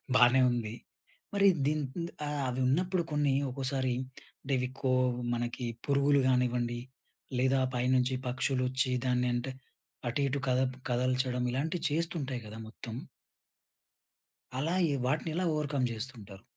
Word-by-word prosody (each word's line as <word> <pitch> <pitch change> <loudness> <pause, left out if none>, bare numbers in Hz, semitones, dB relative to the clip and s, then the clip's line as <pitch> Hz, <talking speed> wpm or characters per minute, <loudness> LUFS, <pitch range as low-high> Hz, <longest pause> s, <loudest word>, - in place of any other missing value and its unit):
బానే 125 +1 +7
ఉంది. 115 -3 -2 0.6
మరి 200 0 +5 0.2
దీని 150 +1 +1 0.2
ఇంత్ 170 0 -3 0.2
ఆహ్, 145 -1 -1
అవి 125 +1 -2
ఉన్నప్పుడు 180 +6 +2
కొన్ని 145 -2 +2 0.2
ఒకోసారి 130 -1 0 0.6
డెవికో 130 0 0 0.4
మనకి 120 +1 -2 0.2
పురుగులు 140 0 +4
గానివ్వండి, 125 -2 +1 0.6
లేదా 130 +1 +3 0.2
పైనుంచి 125 +1 +2
పక్షులొచ్చి 130 0 +1
దాన్ని 125 -1 +2
అంటే 120 +2 -2 0.6
అటు 130 +5 -1
ఇటు 140 +1 -1
కదప్ 130 0 +2
కదల్చడం 125 0 +1
ఇలాంటివి 160 +7 -1
చేస్తుంటాయి 150 -5 -2
గదా 105 +1 -8
మొత్తం... 115 +1 -8 1.6
అలా 160 +6 0 0.2
ఈ - - +1
వాటిని 150 +5 0
ఎలా 180 +2 0
ఓవర్‌కమ్ 145 -4 0
జేస్తుంటారు? 110 -4 -6
130 Hz, 120 wpm, -31 LUFS, 125-145 Hz, 1.6 s, బానే